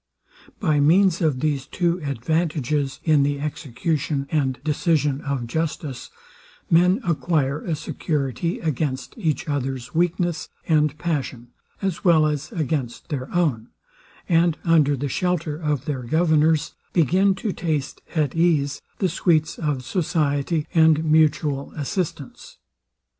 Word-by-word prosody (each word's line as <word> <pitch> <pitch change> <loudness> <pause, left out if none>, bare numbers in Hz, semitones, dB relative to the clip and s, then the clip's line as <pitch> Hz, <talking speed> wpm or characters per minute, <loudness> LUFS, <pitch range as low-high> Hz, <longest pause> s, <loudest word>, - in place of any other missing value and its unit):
By 150 -2 +2
means 175 +5 +4
of 150 -6 +1
these 145 -4 -1
two 175 0 0
advantages, 145 0 -1
in 155 -3 +4
the 140 0 0
execution 145 0 -2
and 135 -5 0
decision 150 -2 +1
of 140 -4 -2
justice, 150 0 -3 0.6
men 180 +7 +4
acquire 155 -4 0
a 165 - -2
security 150 +2 -2
against 145 -4 -2
each 165 - -2
others 135 -3 -3
weakness 175 0 0 0.2
and 150 -2 +2
passion, 135 -8 -3 0.3
as 190 -3 -2
well 165 -4 +5
as 150 -2 -2
against 140 -6 -3
their 135 -4 -4
own, 145 -11 0 0.6
and 170 -2 +3
under 150 -4 +3
the 140 +3 -2
shelter 170 0 -1
of 150 -4 -2
their 140 -4 -2
governors, 160 +3 +2 0.2
begin 185 +4 +3
to 200 +2 -3
taste 155 -5 -3
at 150 -5 +1
ease 150 -4 +1 0.2
the 190 - +1
sweets 160 -2 +1
of 150 -5 -1
society 150 -1 0
and 160 -2 +4
mutual 150 -2 +2
assistance. 150 -1 -4
155 Hz, 125 wpm, -23 LUFS, 140-165 Hz, 0.6 s, well